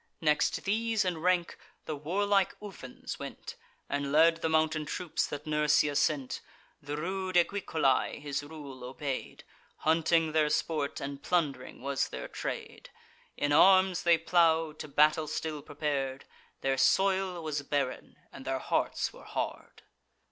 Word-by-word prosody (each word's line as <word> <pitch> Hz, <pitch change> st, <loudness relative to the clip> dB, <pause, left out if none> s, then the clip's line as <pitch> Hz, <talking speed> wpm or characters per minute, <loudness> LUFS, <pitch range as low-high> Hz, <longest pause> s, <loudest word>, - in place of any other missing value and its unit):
Next 150 Hz, 0 st, +1 dB
these 220 Hz, +1 st, +1 dB
in 175 Hz, -3 st, -1 dB
rank, 180 Hz, 0 st, +1 dB, 0.3 s
the 155 Hz, -, -3 dB
warlike 195 Hz, +6 st, +1 dB
Ufens 210 Hz, -2 st, -8 dB
went, -, -, -7 dB, 0.3 s
And 140 Hz, -1 st, -2 dB
led 165 Hz, +2 st, +5 dB
the 160 Hz, -, 0 dB
mountain 160 Hz, 0 st, +2 dB
troops 165 Hz, +3 st, -2 dB
that 145 Hz, +1 st, -6 dB
Nursia 150 Hz, -1 st, +2 dB
sent. 140 Hz, -3 st, 0 dB, 0.4 s
The 145 Hz, +1 st, -5 dB
rude 185 Hz, +3 st, -3 dB
Equicolae 170 Hz, -8 st, +2 dB
his 145 Hz, -1 st, -3 dB
rule 145 Hz, -4 st, -9 dB
obey'd; 130 Hz, +1 st, -5 dB, 0.3 s
Hunting 165 Hz, 0 st, +2 dB
their 155 Hz, -1 st, +3 dB
sport, 150 Hz, -1 st, -1 dB
and 140 Hz, 0 st, -5 dB
plund'ring 140 Hz, -8 st, -1 dB
was 140 Hz, 0 st, 0 dB
their -, -, -6 dB
trade. -, -, -6 dB, 0.5 s
In 145 Hz, -, 0 dB
arms 185 Hz, +3 st, +6 dB
they 170 Hz, -1 st, +5 dB
plow'd, 160 Hz, -2 st, +2 dB
to 155 Hz, -, -6 dB
battle 150 Hz, +2 st, +3 dB
still 155 Hz, 0 st, -3 dB
prepar'd: 140 Hz, -3 st, -3 dB, 0.4 s
Their 135 Hz, -1 st, 0 dB
soil 190 Hz, 0 st, +2 dB
was 150 Hz, -2 st, -2 dB
barren, 140 Hz, -2 st, -2 dB, 0.2 s
and 135 Hz, -, -9 dB
their 135 Hz, 0 st, -1 dB
hearts -, -, -1 dB
were -, -, -14 dB
hard. -, -, -5 dB
155 Hz, 140 wpm, -30 LUFS, 145-175 Hz, 0.5 s, arms